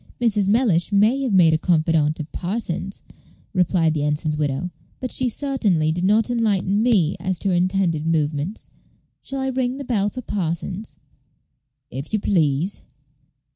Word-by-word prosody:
"Mrs. 210 -5 +1
Mellish 200 -5 +2
may 215 +7 +3
have 260 -4 -1
made 175 -5 +5
a 160 - +2
confidante 160 -3 +1
of 155 - -8
Parsons," 190 0 -4 0.5
replied 175 -3 +2
the 150 -2 -1
ensign's 150 +1 -1
widow, 150 +4 -2 0.3
"but 255 - -4
she 255 -1 0
certainly 215 - 0
did 175 +3 -2
not 210 +3 +3
enlighten 205 -4 +1
me 200 -9 +3
as 185 -2 -2
to 195 - -2
her - - +1
intended 175 -3 +1
movements. 155 +3 -2 0.5
Shall 270 0 -4
I 265 - -1
ring 255 0 -1
the 280 - -5
bell 210 -5 +1
for 255 +4 -7
Parsons?" 185 +1 -4 0.9
"If 135 - -7
you 215 - +2
please." 170 -2 +1
185 Hz, 155 wpm, -22 LUFS, 160-220 Hz, 0.9 s, made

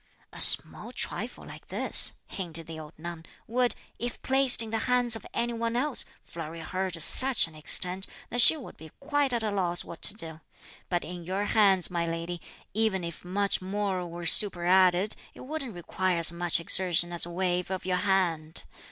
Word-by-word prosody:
"A - - -4
small - - +6
trifle - - -4
like - - -12
this," - - +2
hinted 165 -4 -2
the 160 0 -8
old 155 -1 -12
nun, 170 0 -8 0.2
"would, 245 +1 0 0.2
if 240 +1 -4
placed 265 -3 +4
in 220 - -8
the 225 - -1
hands 245 -2 +2
of 225 - -9
any 235 0 -2
one 230 0 -2
else, 270 +2 +1 0.2
flurry 165 0 -8
her 185 +3 -3
to 170 -2 -4
such 260 +9 +2
an 165 - -12
extent 180 +5 0 0.2
that 245 - +3
she 315 - +9
would 270 - -11
be 160 - -12
quite 290 -1 0
at 235 -2 -1
a 215 - -1
loss 175 -3 0
what 170 - -10
to 210 - +4
do; 160 -5 -7 0.5
but 175 -4 -1
in 175 +1 -8
your 190 +4 -2
hands, 195 -5 +3
my 170 -1 -1
lady, 165 +1 -4 0.3
even 215 -3 +1
if 170 -1 -7
much 195 +3 -1
more 190 -1 -2
were 170 +1 -8
superadded, 185 +1 +3 0.2
it - - -12
wouldn't 275 - -6
require 180 +1 -2
as 170 0 +3
much 170 0 -1
exertion 175 0 +3
as 170 0 +1
a - - -8
wave 180 0 -2
of 190 -1 -4
your 185 -1 0
hand. 175 -5 0
185 Hz, 190 wpm, -28 LUFS, 170-220 Hz, 0.5 s, she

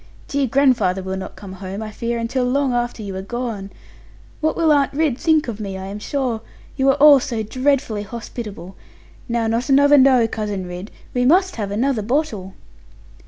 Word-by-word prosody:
Dear 280 -1 0
grandfather 245 -8 +2
will 190 0 -3
not 190 - -7
come 195 -3 -10
home, 190 +2 -6
I 215 - -6
fear, 235 +3 -3
until 230 +3 -1
long 260 +1 +1
after 240 -2 -2
you 195 -2 -6
are - - -4
gone. 220 -2 -4 0.7
What 315 0 0
will 325 -2 +3
Aunt 280 -2 +3
Ridd 290 -4 0
think 315 -3 +2
of 225 -3 -5
me, 195 -3 -5
I 190 - -6
am 200 +2 -6
sure? 250 -1 -2 0.3
You 270 -1 +2
are 270 - +4
all 290 -1 +8
so 240 -5 -3
dreadfully 255 -1 0
hospitable. 210 -4 -8 0.5
Now 235 -1 0
not 230 +4 -1
another 285 +1 +6
"no," 260 -3 +5
Cousin 210 -4 -4
Ridd. 180 +3 -7 0.2
We 245 - +1
must 365 +6 +3
have 205 -3 -3
another 235 +3 0
bottle.' 215 -6 -2
235 Hz, 185 wpm, -20 LUFS, 205-275 Hz, 0.7 s, all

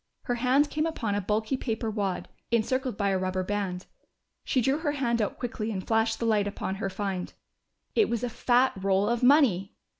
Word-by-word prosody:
Her 245 - -1
hand 260 +4 +2
came 310 +1 0
upon 230 -10 -2
a 205 - 0
bulky 215 +6 0
paper 225 -3 -2
wad, 200 -4 -2 0.2
encircled 250 +1 0
by 200 -2 +1
a 190 -1 +1
rubber 185 0 -1
band. 190 -2 -3 0.6
She 260 - +1
drew 270 +5 +2
her 300 -3 -1
hand 235 -5 0
out 205 - -2
quickly 225 -3 -3
and 190 -4 -4
flashed 225 0 +1
the 230 - -2
light 210 -3 +2
upon 200 -1 -3
her 195 - -1
find. 190 -1 -3 0.6
It 435 -3 +3
was 235 0 -1
a - - +1
fat 245 +3 +2
roll 195 +1 +1
of 235 +1 0
money! 250 - +4
225 Hz, 200 wpm, -28 LUFS, 200-250 Hz, 0.6 s, money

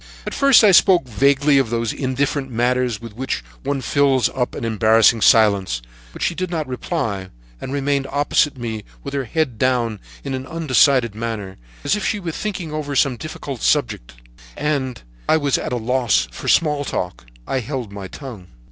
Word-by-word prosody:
At - - -4
first 275 -4 +5
I 210 - +7
spoke 180 -5 +5
vaguely 140 +4 +3
of 130 -4 0
those 115 -1 -1
indifferent 135 +1 -1
matters 125 -1 0
with 115 -3 -10
which 130 +3 -3 0.2
one 140 0 -2
fills 135 0 +2
up 125 -2 -3
an - - -4
embarrassing 110 0 +4
silence, 100 - +4 0.3
but - - -6
she - - +1
did 185 +1 -3
not 160 -3 -2
reply, 100 -6 -3 0.3
and 130 - -6
remained 140 0 0
opposite 145 0 +1
to - - -14
me 110 -3 -4 0.2
with 140 - -6
her 140 -2 -2
head 130 -4 -1
down 120 -4 +1 0.2
in 140 - -4
an 130 0 -5
undecided 135 -7 +3
manner, 110 -4 -5 0.3
as - - +2
if 210 - -4
she 210 - 0
were 175 -4 -4
thinking 180 -3 -4
over 145 -2 -3
some 135 -2 +3
difficult 140 -2 -7
subject, 110 - 0 0.4
and 135 -5 -1
as - - -18 0.3
I 160 - +5
was 145 -3 +1
at - - -4
a - - 0
loss 115 - +1
for - - -8
small 150 -3 +3
talk, 65 - -4 0.2
I 135 - -1
held 125 -3 -5
my 100 -1 -7
tongue. 115 -7 -10
130 Hz, 185 wpm, -20 LUFS, 115-145 Hz, 0.4 s, I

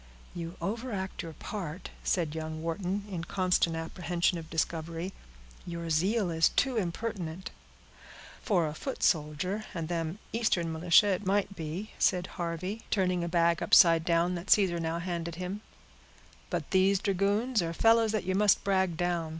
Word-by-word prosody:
"You 170 0 -6
overact 205 -3 -3
your 165 -3 -7
part," 180 -1 -6
said 165 -5 0
young 160 0 -5
Wharton, 185 +4 -2
in 180 -5 -4
constant 180 -2 +1
apprehension 170 +1 -1
of 160 -1 -10
discovery; 165 +2 -2 0.5
"your 170 -1 -5
zeal 190 +4 +1
is 165 0 +4
too 265 -2 +1
intemperate." 185 -3 -3 0.9
"For 185 -8 +2
a 150 - -3
foot 265 - -5
soldier 165 +6 0
and 165 -1 -3
them 165 +1 -2 0.2
Eastern 185 -8 +1
militia, 170 +5 +4
it 190 0 0
might 200 0 +1
be," 170 +6 -5
said 180 0 +2 0.2
Harvey, 180 +6 -3
turning 185 -3 +1
a 170 - -2
bag 170 -1 +2
upside 165 -5 +6
down, 170 +1 +2
that 180 +2 -6
Caesar 185 -5 +4
now 165 0 -2
handed 170 -1 -4
him; 185 +4 -5 0.9
"but - - -3
these 190 0 +4
dragoons 205 +5 +1
are 165 -1 -2
fellows 225 +4 +4
that 215 -2 -1
you 185 +1 -1
must 205 +1 +4
brag 190 -4 +1
down. 175 -2 -1
180 Hz, 155 wpm, -30 LUFS, 165-200 Hz, 0.9 s, upside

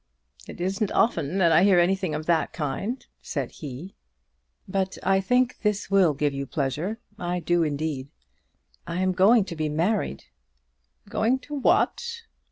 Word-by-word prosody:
"It - - -10
isn't 190 +3 -1
often 170 -6 +1
that 170 -4 +4
I 165 +3 +6
hear 195 -2 +5
anything 185 -2 +1
of 155 +1 -4
that 165 -1 +1
kind," 175 - -3 0.2
said - - -4
he. 150 +6 -8 0.7
"But 190 0 -1
I 195 +1 +3
think 250 +4 +2
that - - -35
this 210 -2 -1
will 185 -7 +4
give 145 0 0
you 140 0 -4
pleasure. 155 - -2 0.2
I 175 0 -2
do 175 +1 +1
indeed. 150 -3 -2 0.8
I 170 +1 -3
am 185 0 +2
going 195 +4 +5
to 170 - -6
be 155 -1 -1
married." 165 - -1 0.8
"Going 245 +4 +1
to 295 - -9
what?" 465 - +1
180 Hz, 160 wpm, -25 LUFS, 155-200 Hz, 0.8 s, I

